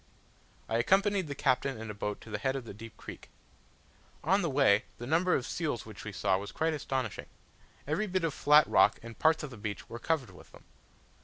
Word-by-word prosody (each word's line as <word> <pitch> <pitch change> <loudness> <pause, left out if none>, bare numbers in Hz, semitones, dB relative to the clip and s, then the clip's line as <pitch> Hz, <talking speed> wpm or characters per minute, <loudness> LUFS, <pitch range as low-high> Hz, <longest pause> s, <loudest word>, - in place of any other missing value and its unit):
I 115 - 0
accompanied 195 - +3
the 140 - -5
Captain 135 -2 +1
in 110 -1 -5
a - - -7
boat 105 0 -4
to - - -12
the 105 - -2
head 130 +4 0
of 130 -4 -5
a - - -7
deep 115 +2 -11
creek. - - -10 0.9
On 195 +2 +3
the 170 - 0
way 135 -7 +4
the 120 - -7
number 170 +6 +3
of 130 - -1
seals 150 -8 -2
which 110 -2 -10
we 110 - -5
saw 95 -1 +1
was 100 - -7
quite 160 0 0
astonishing: 130 -7 -3 0.6
every 170 +9 -1
bit 185 -2 -1
of 165 -3 0
flat 150 +1 +6
rock, 95 +2 +4
and 115 0 -10
parts 160 0 +3
of 145 - -6
the 120 - -9
beach, 105 -1 -5
were 115 - -6
covered 135 -7 -1
with 90 - -16
them. - - -15
135 Hz, 220 wpm, -31 LUFS, 110-160 Hz, 0.9 s, flat